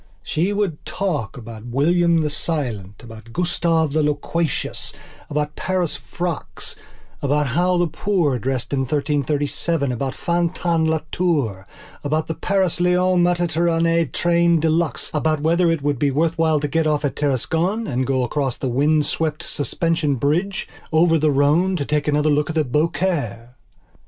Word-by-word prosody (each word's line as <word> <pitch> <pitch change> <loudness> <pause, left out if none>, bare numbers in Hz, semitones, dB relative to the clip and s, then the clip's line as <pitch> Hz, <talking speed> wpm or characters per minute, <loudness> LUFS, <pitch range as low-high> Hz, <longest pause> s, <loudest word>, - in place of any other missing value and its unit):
She 175 +6 0
would 200 -7 -1
talk 155 - -3
about 115 -1 -9
William 165 +6 +3
the 150 - 0
Silent, 120 - -3
about 115 0 -12
Gustave 165 -1 +1
the 155 - +2
Loquacious, 150 +2 -2 0.4
about 150 0 -2
Paris 185 -3 -1
frocks, 170 -6 -5 0.5
about 145 +1 +1
how 175 +7 +1
the 175 - +3
poor 165 -6 0
dressed 130 +2 -2
in 140 - +1
1337, 145 +1 0
about 130 +2 -3
Fantin 170 -1 0
Latour, 150 - -1 0.4
about 155 +2 0
the 160 - -3
Paris 190 0 0
Lyons 180 0 +3
Mediterranée 170 -2 +1
train 170 -1 +3
deluxe, 160 0 0
about 155 0 +1
whether 170 +3 +3
it 165 -4 -1
would 145 -3 0
be 145 - +2
worth 160 +4 +1
while 160 -2 +2
to 150 - -1
get 160 +2 +1
off 150 -1 +1
at 140 - -2
Tarascon 160 - 0
and 130 - -1
go 130 -2 +1
across 135 0 -1
the 130 - -2
windswept 150 +3 +1
suspension 155 +1 -1
bridge, 170 - 0 0.2
over 165 0 +4
the 155 +1 +3
Rhone 150 +7 +3
to 145 -5 -2
take 150 0 -1
another 150 +1 +2
look 145 0 +1
at 160 - -3 0.2
Beaucaire. 150 - 0
155 Hz, 145 wpm, -21 LUFS, 140-170 Hz, 0.5 s, over